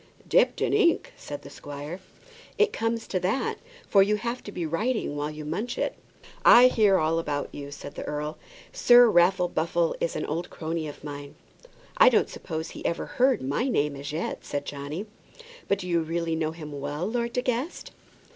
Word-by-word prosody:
"Dipped -, -, +3 dB
in -, -, +1 dB
ink!" 420 Hz, +5 st, +2 dB
said -, -, -8 dB
the -, -, -11 dB
squire. 145 Hz, +4 st, -7 dB, 0.6 s
"It 430 Hz, +1 st, +3 dB
comes 225 Hz, 0 st, -1 dB
to 185 Hz, -, -1 dB
that, 190 Hz, +9 st, -1 dB, 0.3 s
for 200 Hz, -, +5 dB
you 205 Hz, +2 st, +3 dB
have 235 Hz, +4 st, -3 dB
to 205 Hz, -, -6 dB
be 175 Hz, -4 st, -3 dB
writing 205 Hz, -, -1 dB
while 145 Hz, +1 st, -2 dB
you 155 Hz, 0 st, -7 dB
munch 205 Hz, +11 st, -3 dB
it." -, -, -1 dB, 0.5 s
"I 250 Hz, +1 st, +9 dB
hear 210 Hz, -5 st, +4 dB
all 160 Hz, 0 st, +1 dB
about 145 Hz, -3 st, -3 dB
you," 140 Hz, -1 st, -7 dB
said 145 Hz, -, -9 dB
the -, -, -6 dB
earl; 150 Hz, +1 st, -4 dB, 0.3 s
"Sir 245 Hz, -, +7 dB
Raffle 180 Hz, 0 st, +4 dB
Buffle 170 Hz, 0 st, 0 dB
is 170 Hz, -, -1 dB
an -, -, -2 dB
old 170 Hz, +4 st, -3 dB
crony 160 Hz, 0 st, -4 dB
of 145 Hz, -, -10 dB
mine." 145 Hz, -1 st, -7 dB, 0.6 s
"I -, -, +8 dB
don't -, -, +2 dB
suppose 160 Hz, -2 st, -5 dB
he -, -, -9 dB
ever 170 Hz, -, -1 dB
heard 255 Hz, -, +2 dB
my 145 Hz, -, 0 dB
name 150 Hz, -, +1 dB
as 140 Hz, +1 st, -6 dB
yet," 160 Hz, +3 st, -3 dB
said 145 Hz, -1 st, -4 dB
Johnny. 145 Hz, +7 st, -5 dB, 0.6 s
"But 200 Hz, -, +2 dB
do 185 Hz, -2 st, -7 dB
you 170 Hz, -1 st, +2 dB
really 165 Hz, 0 st, -2 dB
know 160 Hz, -1 st, 0 dB
him 155 Hz, -2 st, -9 dB
well, 145 Hz, +4 st, -3 dB
Lord 235 Hz, +2 st, -2 dB
De 250 Hz, -, 0 dB
Guest?" 255 Hz, +6 st, -3 dB
170 Hz, 195 wpm, -26 LUFS, 150-230 Hz, 0.6 s, I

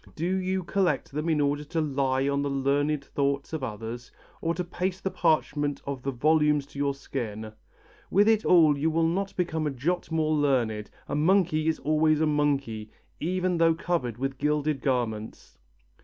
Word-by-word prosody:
Do 160 Hz, -, -3 dB
you 185 Hz, 0 st, 0 dB
collect 175 Hz, -5 st, 0 dB
them 150 Hz, +4 st, -2 dB
in 155 Hz, -2 st, +2 dB
order 145 Hz, 0 st, +1 dB
to 165 Hz, +3 st, -2 dB
lie 135 Hz, -3 st, 0 dB
on 140 Hz, 0 st, +1 dB
the 140 Hz, -, -1 dB
learned 140 Hz, +1 st, 0 dB
thoughts 140 Hz, +1 st, -1 dB
of 155 Hz, -4 st, -3 dB
others, 115 Hz, +1 st, -6 dB, 0.3 s
or 165 Hz, 0 st, 0 dB
to 180 Hz, -, -2 dB
paste 185 Hz, +1 st, -3 dB
the 190 Hz, -, -1 dB
parchment 155 Hz, -4 st, +1 dB
of 140 Hz, -2 st, -4 dB
the 135 Hz, -, -2 dB
volumes 150 Hz, +2 st, +2 dB
to 140 Hz, -, -11 dB
your 140 Hz, -1 st, 0 dB
skin? 110 Hz, -6 st, -5 dB, 0.6 s
With 205 Hz, +3 st, +4 dB
it 220 Hz, -1 st, +4 dB
all 160 Hz, -5 st, +5 dB
you 160 Hz, +3 st, +2 dB
will 165 Hz, +1 st, +1 dB
not 190 Hz, +4 st, -1 dB
become 160 Hz, -4 st, -1 dB
a -, -, +1 dB
jot 150 Hz, +7 st, -2 dB
more 155 Hz, -1 st, +1 dB
learned; 125 Hz, -8 st, +1 dB, 0.2 s
a -, -, -5 dB
monkey 160 Hz, 0 st, +2 dB
is 160 Hz, -, +1 dB
always 155 Hz, 0 st, +2 dB
a 160 Hz, -, +3 dB
monkey, 140 Hz, -8 st, 0 dB, 0.3 s
even 180 Hz, +1 st, 0 dB
though 165 Hz, -1 st, +4 dB
covered 150 Hz, -10 st, -2 dB
with 135 Hz, 0 st, -3 dB
gilded 150 Hz, -1 st, 0 dB
garments." 115 Hz, -5 st, -3 dB
150 Hz, 180 wpm, -27 LUFS, 135-165 Hz, 0.6 s, all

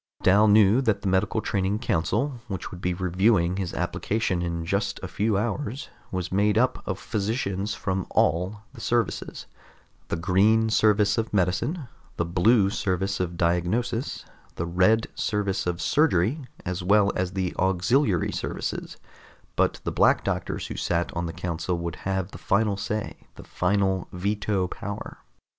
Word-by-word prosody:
Dal 100 Hz, +3 st, +5 dB
knew 105 Hz, +3 st, +6 dB
that 110 Hz, -6 st, 0 dB
the -, -, -1 dB
medical 95 Hz, +3 st, +1 dB
training 100 Hz, 0 st, 0 dB
council, 115 Hz, -, -1 dB
which 95 Hz, -4 st, -5 dB
would 90 Hz, -, -9 dB
be 90 Hz, 0 st, 0 dB
reviewing 95 Hz, 0 st, +2 dB
his 95 Hz, -3 st, -2 dB
application 90 Hz, +2 st, -1 dB
in 85 Hz, -1 st, -3 dB
just 100 Hz, +4 st, -1 dB
a -, -, -3 dB
few 100 Hz, +4 st, 0 dB
hours, 120 Hz, +4 st, -3 dB, 0.2 s
was 90 Hz, -1 st, -3 dB
made 100 Hz, +2 st, +2 dB
up -, -, +2 dB
of -, -, -2 dB
physicians 100 Hz, -2 st, -2 dB
from 95 Hz, -2 st, -2 dB
all 90 Hz, +6 st, +1 dB
the -, -, -11 dB
services 120 Hz, -1 st, -1 dB, 0.6 s
the -, -, -1 dB
Green 105 Hz, +6 st, +3 dB
Service 105 Hz, 0 st, +3 dB
of 110 Hz, -, -2 dB
Medicine, 115 Hz, -, 0 dB, 0.3 s
the 85 Hz, -, 0 dB
Blue 95 Hz, +4 st, +3 dB
Service 95 Hz, 0 st, -1 dB
of 90 Hz, -2 st, -2 dB
Diagnosis, 105 Hz, +10 st, 0 dB, 0.3 s
the 85 Hz, -, -2 dB
Red 95 Hz, +6 st, +3 dB
Service 100 Hz, -3 st, -1 dB
of 90 Hz, -1 st, -1 dB
Surgery, 125 Hz, -, +2 dB, 0.2 s
as 90 Hz, 0 st, -3 dB
well 100 Hz, +2 st, +4 dB
as 90 Hz, 0 st, -1 dB
the 95 Hz, -2 st, -2 dB
Auxiliary 95 Hz, -, +2 dB
Services -, -, -4 dB, 0.6 s
but -, -, +1 dB
the -, -, -2 dB
Black -, -, +3 dB
Doctors -, -, -2 dB
who -, -, -6 dB
sat 85 Hz, 0 st, -1 dB
on 85 Hz, 0 st, -1 dB
the -, -, -4 dB
council 85 Hz, +1 st, -3 dB
would 85 Hz, -1 st, -4 dB
have 95 Hz, 0 st, -2 dB
the -, -, -10 dB
final 105 Hz, 0 st, +1 dB
say, 105 Hz, +2 st, -4 dB
the -, -, -11 dB
final 95 Hz, 0 st, 0 dB
veto 100 Hz, 0 st, -1 dB
power. 100 Hz, +3 st, -7 dB
95 Hz, 155 wpm, -25 LUFS, 90-110 Hz, 0.6 s, knew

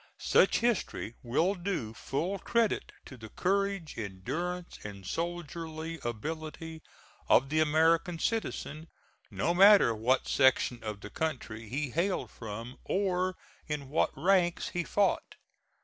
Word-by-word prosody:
Such -, -, +3 dB
history 230 Hz, -, 0 dB
will 160 Hz, +11 st, +1 dB
do 175 Hz, -, -3 dB
full 170 Hz, +11 st, -2 dB
credit 230 Hz, +3 st, 0 dB
to 130 Hz, -, -10 dB
the 110 Hz, -2 st, -10 dB
courage, 195 Hz, -, -1 dB
endurance 165 Hz, -, -4 dB
and 100 Hz, -2 st, -8 dB
soldierly 165 Hz, -, -4 dB
ability 155 Hz, +7 st, -5 dB, 0.5 s
of 135 Hz, -, +5 dB
the 155 Hz, +1 st, +1 dB
American 160 Hz, +3 st, +3 dB
citizen, 165 Hz, -6 st, -2 dB, 0.4 s
no 170 Hz, -, 0 dB
matter 195 Hz, -, +7 dB
what 120 Hz, +4 st, +1 dB
section 130 Hz, -3 st, +3 dB
of 105 Hz, -2 st, -5 dB
the 105 Hz, -, -9 dB
country 115 Hz, -8 st, -4 dB
he 140 Hz, +2 st, -2 dB
hailed 180 Hz, +6 st, -1 dB
from, 115 Hz, +3 st, -7 dB
or 185 Hz, -1 st, 0 dB, 0.3 s
in 145 Hz, -3 st, -4 dB
what 155 Hz, -, +2 dB
ranks 175 Hz, +2 st, +2 dB
he 175 Hz, -, -2 dB
fought. 200 Hz, +3 st, 0 dB
160 Hz, 125 wpm, -30 LUFS, 125-180 Hz, 0.5 s, matter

